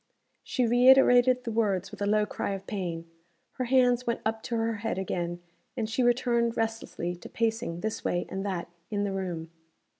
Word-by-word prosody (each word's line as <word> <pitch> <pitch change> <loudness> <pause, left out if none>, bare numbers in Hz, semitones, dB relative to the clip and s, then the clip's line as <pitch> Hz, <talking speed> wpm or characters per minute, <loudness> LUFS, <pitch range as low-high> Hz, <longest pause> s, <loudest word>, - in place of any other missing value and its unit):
She 255 - 0
reiterated 250 +1 +6
the 230 - -3
words 200 -4 0
with - - -11
a 200 - +1
low 210 0 +3
cry 200 - -3
of 195 0 -9
pain. 175 -5 -4 0.4
Her 255 - -3
hands 250 -1 +3
went 235 - -1
up 220 0 -1
to 235 - -2
her 225 -1 0
head 225 -1 -3
again; 175 -2 -3 0.3
and 225 -3 -1
she 225 +3 -1
returned 240 -1 +2
restlessly 225 -6 -2
to - - -11
pacing 225 -6 -1
this 220 0 -3
way 175 0 0
and 190 0 -4
that 190 -4 -3 0.2
in 205 -1 -1
the 200 - -1
room. 175 -4 -4
220 Hz, 185 wpm, -28 LUFS, 190-240 Hz, 0.4 s, reiterated